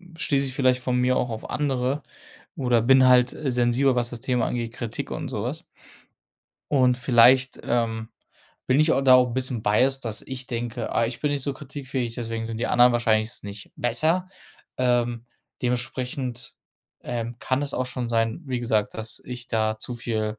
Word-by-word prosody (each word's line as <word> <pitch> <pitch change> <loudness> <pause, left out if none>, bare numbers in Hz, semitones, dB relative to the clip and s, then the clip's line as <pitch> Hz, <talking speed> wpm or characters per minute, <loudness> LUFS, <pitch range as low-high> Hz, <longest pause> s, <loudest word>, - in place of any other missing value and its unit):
schließe 140 -4 0
ich - - -7
vielleicht 130 -1 +2
von 125 0 0
mir 125 +1 +2
auch 120 - -1
auf 110 - -6
andere 135 0 -1 0.5
oder 120 -4 +2
bin 130 +2 +6
halt, 125 -1 +5
äh, 150 - -3
sensibel, 125 +2 +2
was 120 -1 0
das 120 -2 -7
Thema 125 -1 0
angeht, 115 -1 -3
Kritik 115 -2 -5
und - - -5
sowas. - - -4 1.1
Und 130 -3 +4
vielleicht, 125 +1 +4
ähm, 115 -2 -1 0.6
bin 130 +2 +4
ich 155 +2 +4
auch - - +2
da 130 -1 +7
auch 125 0 +4
'n - - -5
bisschen 130 -2 -2
biased, 130 +6 +2
dass 110 -2 -2
ich 130 -1 -7
denke: 120 0 -4
„Ah, 115 - +2
ich 115 +1 -4
bin 150 -1 0
nicht 140 -2 -2
so 140 - 0
kritikfähig, 135 -4 -5
deswegen 115 -1 -4
sind 115 0 -5
die - - -1
anderen 125 0 +5
wahrscheinlich 110 -2 +2
s - - -5
nicht 100 0 -8
besser“, 155 +10 0 0.5
ähm, 120 -2 0 0.4
dementsprechend, 125 0 -3 0.5
ähm, 120 -1 -4
kann 130 +1 0
es 145 - -1
auch 125 - -1
schon 125 -1 -4
sein, 115 +3 0
wie 125 -2 -2
gesagt, 110 -3 0
dass 110 0 0
ich 125 0 -6
da 110 -1 0
zu 125 - -2
viel 110 -2 -3
125 Hz, 185 wpm, -24 LUFS, 115-130 Hz, 1.1 s, da